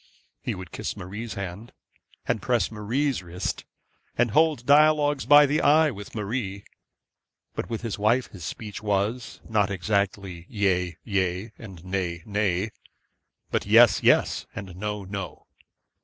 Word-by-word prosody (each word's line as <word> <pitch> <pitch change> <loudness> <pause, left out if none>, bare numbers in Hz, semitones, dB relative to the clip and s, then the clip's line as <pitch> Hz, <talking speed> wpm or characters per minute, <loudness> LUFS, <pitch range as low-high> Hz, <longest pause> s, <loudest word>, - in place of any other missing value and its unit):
He - - -3
would 95 -2 -9
kiss - - -5
Marie's 105 +4 -6
hand, 100 +3 -6 0.5
and - - 0
press - - +1
Marie's 115 +4 -1
wrist, 90 +1 -4 0.5
and 120 -2 +2
hold 155 -2 +3
dialogues 145 0 +4
by 145 0 +8
the 145 +2 +1
eye 155 +1 +5
with 105 -2 -10
Marie. 100 -2 -3 0.9
But - - -4
with 115 0 -4
his 115 -3 -4
wife 115 +5 +3
his 90 -4 -10
speech 105 +2 -6
was, 105 +4 -1
not 105 -3 +2
exactly 95 -2 -2
yea, 90 -5 0
yea, 95 0 -1
and 95 -6 -11
nay, 90 -3 -3
nay, 105 -1 0 0.8
but - - -1
yes, 115 +1 +6
yes, - - +3
and 95 -3 -7
no, 105 +1 -4
no. 95 -4 -6
105 Hz, 140 wpm, -26 LUFS, 95-120 Hz, 0.9 s, by